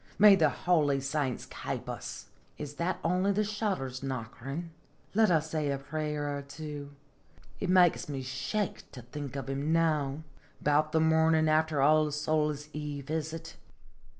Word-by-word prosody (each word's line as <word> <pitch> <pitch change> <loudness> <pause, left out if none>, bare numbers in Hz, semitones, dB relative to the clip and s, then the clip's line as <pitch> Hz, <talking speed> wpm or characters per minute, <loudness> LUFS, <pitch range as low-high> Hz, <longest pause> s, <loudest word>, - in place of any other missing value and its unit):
May 205 -1 +9
the 160 -5 +4
holy 145 -2 +2
saints 135 -1 -2
kape - - -5
us! - - -6 0.3
Is 145 -1 -7
that 175 +2 0
only 180 +4 +2
the 210 +2 +2
shutters 200 - -2
knockiri'? 135 +5 -5 0.4
Let 220 0 +4
us 160 -2 +2
say 155 -2 0
a 140 - 0
prayer 150 0 -3
or - - -5
two. 145 0 -8 0.6
It 195 - -2
makes 180 -4 +4
me 135 -2 -3
shake 135 +11 -3
to 125 - -9
think 140 +2 -7
of 135 - -4
him 140 +3 -1
now. 155 -3 +1 0.4
"About 150 +1 +2
the 160 - +3
mornin' 160 0 +4
after 155 -2 +2
All 155 +1 +5
Souls' 150 0 0
Eve, 145 -2 -5
is 160 -1 -1
it? 165 0 -8
150 Hz, 155 wpm, -30 LUFS, 140-160 Hz, 0.6 s, May